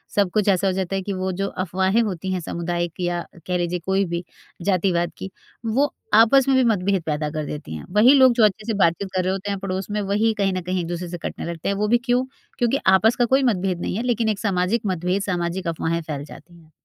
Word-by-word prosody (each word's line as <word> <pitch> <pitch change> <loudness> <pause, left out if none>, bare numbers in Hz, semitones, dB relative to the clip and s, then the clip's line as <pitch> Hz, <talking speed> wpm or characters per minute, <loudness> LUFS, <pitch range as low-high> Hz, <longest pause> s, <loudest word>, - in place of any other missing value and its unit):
सब 200 -2 +3
कुछ 210 -2 +1
ऐसा 195 0 +2
हो - - +2
जाता 190 0 -2
है 195 - -1
कि 200 - -3
वो 185 0 -2
जो 195 - 0 0.2
अफ़वाहें 190 +4 +1
होती 190 -4 -3
हैं 185 - -1
समुदाय 170 +1 -2
की 175 +2 -5
या 175 0 -1 0.3
कह 180 -1 0
लीजिए 175 0 -1
कोई 195 +1 +1
भी 170 +1 -2 0.4
जातिवाद 180 -3 +1
की, 190 - -6 0.4
वो 270 +6 +1 0.2
आपस 230 +5 +6
में 270 - +4
भी 260 - +4
मतभेद 195 -2 +1
पैदा 150 -1 -1
कर 155 -1 -3
देती 145 - -6
हैं। 75 - -8
वही 235 +6 +7
लोग 260 -3 +6
जो 235 -2 +3
अच्छे 210 +1 0
से 225 - 0
बातचीत 170 +4 +1
कर 185 - +1
रहे 185 +1 0
होते 195 +1 -4
हैं 200 - -3
पड़ोस 190 0 -4
में 210 0 -1
वही 210 +3 +1
कहीं 195 -2 +1
न 185 - -2
कहीं 180 +1 -2
एक 165 - -5
दूसरे 175 +1 -4
से 175 - -5
कटने - - -6
लगते 165 +1 -4
हैं 200 - 0
वो 210 +1 0
भी 240 - +4
क्यों? 250 +1 +2 0.3
क्योंकि 240 +2 +2
आपस 190 +5 +5
का 245 - +2
कोई 265 +3 +2
मतभेद 190 -6 0
नहीं - - -2
है 230 - -2
लेकिन 235 -2 +1
एक 210 -2 -1
सामाजिक 200 +2 0
मतभेद 185 0 0
सामाजिक 180 -1 -2
अफ़वाहें 165 0 -1
फैल 150 -3 -5
जाती 175 +3 -14
हैं। 160 -2 -21
190 Hz, 255 wpm, -22 LUFS, 175-210 Hz, 0.4 s, वही